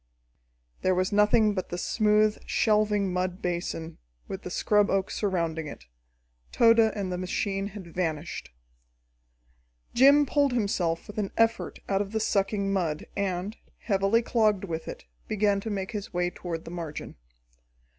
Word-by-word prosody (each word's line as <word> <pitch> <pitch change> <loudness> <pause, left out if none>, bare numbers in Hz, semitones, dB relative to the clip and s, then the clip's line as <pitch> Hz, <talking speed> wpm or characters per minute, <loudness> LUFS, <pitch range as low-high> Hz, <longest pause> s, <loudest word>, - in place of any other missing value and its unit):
There 185 - +2
was 185 +1 0
nothing 210 +1 +4
but 185 -2 -4
the 175 - -4
smooth, 210 +2 +2
shelving 210 -3 +2
mud 180 0 -1
basin, 170 -2 -4 0.3
with 190 - -5
the - - -6
scrub 205 +3 +2
oak 195 -1 0
surrounding 165 -6 -1
it. 65 - -10 0.7
Tode 230 0 +5
and 205 -4 +2
the 180 - -3
machine 195 +2 -2
had 200 -2 -9
vanished. 160 -3 -3 1.4
Jim 280 +4 +6
pulled 285 -1 +2
himself 185 -7 0
with 210 +1 -6
an 200 -2 -1
effort 225 0 +1
out 195 0 +1
of 205 +1 -5
the 220 - +1
sucking 200 -1 0
mud, 165 -6 -1
and, 195 +1 -2 0.2
heavily 200 +2 +1
clogged 215 -5 +2
with 165 -4 -4
it, - - -8 0.2
began 205 -1 +2
to 220 - -5
make 195 -2 -3
his 205 -3 -5
way 175 0 0
toward 170 -3 -6
the 165 - -8
margin. 165 -4 -6
195 Hz, 150 wpm, -27 LUFS, 180-215 Hz, 1.4 s, Jim